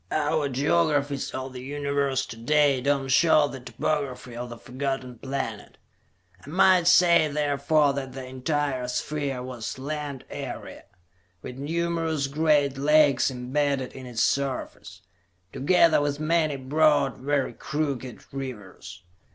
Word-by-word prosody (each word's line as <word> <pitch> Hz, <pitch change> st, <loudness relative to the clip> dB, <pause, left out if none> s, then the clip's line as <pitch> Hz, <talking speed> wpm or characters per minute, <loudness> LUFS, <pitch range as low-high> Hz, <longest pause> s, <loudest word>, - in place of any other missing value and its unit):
Our 150 Hz, -1 st, 0 dB
geographies 145 Hz, 0 st, +1 dB
of 130 Hz, 0 st, -6 dB
the 125 Hz, -, -7 dB
Universe 140 Hz, -1 st, -1 dB
to 120 Hz, -, -9 dB
day 140 Hz, +3 st, +2 dB
do 140 Hz, +1 st, +1 dB
not 135 Hz, -, -4 dB
show 155 Hz, +1 st, +5 dB
the 135 Hz, -2 st, -8 dB
topography 130 Hz, -2 st, -3 dB
of 120 Hz, +1 st, -5 dB
the 120 Hz, -, -8 dB
Forgotten 130 Hz, -1 st, -4 dB
Planet: 135 Hz, 0 st, -5 dB, 0.7 s
I -, -, -11 dB
might 185 Hz, +1 st, +4 dB
say, 170 Hz, -3 st, +6 dB
therefore, 145 Hz, 0 st, +1 dB
that 135 Hz, -2 st, -5 dB
the 130 Hz, 0 st, -7 dB
entire 130 Hz, 0 st, -2 dB
sphere 135 Hz, 0 st, -3 dB
was 125 Hz, -2 st, -6 dB
land 145 Hz, -1 st, -5 dB
area, -, -, -7 dB, 0.6 s
with 125 Hz, +1 st, -8 dB
numerous 165 Hz, 0 st, -1 dB
great 145 Hz, -1 st, +1 dB
lakes 145 Hz, -3 st, +4 dB
embedded 130 Hz, +1 st, -1 dB
in 130 Hz, -1 st, -9 dB
its 120 Hz, -2 st, -1 dB
surface, 125 Hz, -9 st, -2 dB, 0.5 s
together 165 Hz, +2 st, +4 dB
with 145 Hz, 0 st, -1 dB
many 155 Hz, -1 st, +1 dB
broad, 145 Hz, 0 st, +2 dB
very 135 Hz, -1 st, -1 dB
crooked 135 Hz, -2 st, -4 dB
rivers. 105 Hz, -8 st, -8 dB
140 Hz, 130 wpm, -26 LUFS, 130-150 Hz, 0.7 s, say